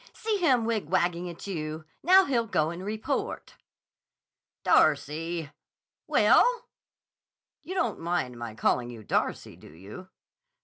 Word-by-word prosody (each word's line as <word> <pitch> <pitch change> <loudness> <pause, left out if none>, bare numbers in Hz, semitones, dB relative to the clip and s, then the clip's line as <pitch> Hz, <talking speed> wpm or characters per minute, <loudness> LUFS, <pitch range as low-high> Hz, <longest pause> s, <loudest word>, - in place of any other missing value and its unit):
"See 435 -2 -1
him 260 - +2
wigwagging 180 -5 0
at 170 - -10
you! 155 -4 -5 0.2
Now 375 +2 +6
he'll 235 -4 0
go 155 -5 0
and 175 +2 -7
report." 215 +2 -3 1.1
"Darcy!" 155 +1 +1 0.6
"Well?" - - +5 1.2
"You 375 - -7
don't 240 - -1
mind 165 -7 -2
my 120 -2 -7
calling 120 +2 0
you 115 -3 -10
Darcy, - - -2
do - - -15
you?" 100 - -11
170 Hz, 120 wpm, -27 LUFS, 150-220 Hz, 1.2 s, Now